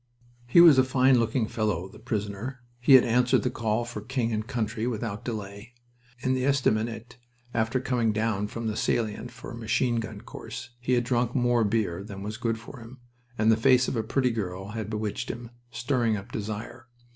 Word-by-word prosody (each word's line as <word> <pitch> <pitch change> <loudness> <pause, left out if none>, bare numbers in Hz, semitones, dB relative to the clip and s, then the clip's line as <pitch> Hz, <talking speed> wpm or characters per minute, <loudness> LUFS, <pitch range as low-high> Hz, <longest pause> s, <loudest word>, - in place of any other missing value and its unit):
He 145 +8 +7
was 160 -6 +8
a - - +6
fine 130 0 +4
looking 115 0 0
fellow, 105 -6 -1
the 105 - -15
prisoner. 115 +2 -4 0.2
He 125 +3 +5
had 130 - +8
answered 125 +2 +3
the 125 - 0
call 115 0 -1
for 120 -3 -6
king 120 +1 -1
and 110 +1 -2
country 115 -2 -2
without 110 -3 -3
delay. 105 0 -6 0.5
In 130 +1 +1
the 130 -1 0
estaminet, 120 -3 0 0.4
after 110 +3 +1
coming 125 -3 +1
down 105 -1 0
from 115 +2 -6
the 110 -1 -1
salient 110 +1 -1
for 120 0 -10
a - - -7
machine 115 +1 0
gun 115 -1 -5
course, - - -8
he 125 +1 0
had 120 -1 +3
drunk 120 0 0
more 120 -2 +3
beer 100 -4 0
than 100 -2 -8
was 105 +2 -5
good 115 -1 -1
for 115 +4 -11
him, 115 +3 -12 0.4
and 110 +1 +4
the - - +5
face 125 +3 +4
of - - -2
a 115 - +1
pretty 125 +3 +1
girl 95 -3 -4
had 110 -1 -5
bewitched 105 -1 -3
him, 120 0 -6 0.2
stirring 120 -2 0
up 95 - -9
desire. 110 +3 -6
115 Hz, 195 wpm, -27 LUFS, 110-125 Hz, 0.5 s, was